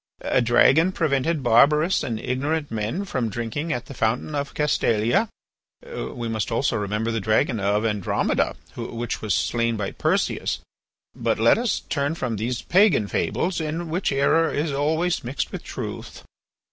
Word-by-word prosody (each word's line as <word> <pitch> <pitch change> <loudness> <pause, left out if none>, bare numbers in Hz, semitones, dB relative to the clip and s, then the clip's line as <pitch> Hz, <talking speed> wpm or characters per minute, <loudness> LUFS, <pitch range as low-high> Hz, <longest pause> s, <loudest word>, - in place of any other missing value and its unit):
A 130 - +2
dragon 135 +9 +4
prevented 150 -1 0
barbarous 150 +9 +4
and 115 -3 -3
ignorant 140 +5 -2
men 110 - -2
from 125 - -2
drinking 120 - -3
at 120 -2 -2
the 140 - -9
fountain 115 +5 -1
of 140 -1 -3
Castalia. 150 - +2 0.6
We 300 - -5
must 110 -1 -2
also 115 +4 +1
remember 105 +2 -1
the 115 - -1
dragon 110 +2 +1
of 100 +2 +1
Andromeda, 105 -4 0 0.2
which 120 0 -4
was 105 -5 0
slain 115 -1 0
by 100 -2 -3
Perseus. - - 0 0.6
But - - 0
let 115 - +4
us 240 -2 0
turn 145 +1 -2
from 125 -8 -3
these 115 +3 -3
pagan 185 - +4
fables, 175 - -1
in 160 +1 -3
which 180 0 0
error 140 +4 +3
is 150 +1 -1
always 160 +5 0
mixed 130 +4 -3
with - - -6
truth. - - -7
130 Hz, 155 wpm, -24 LUFS, 115-160 Hz, 0.6 s, dragon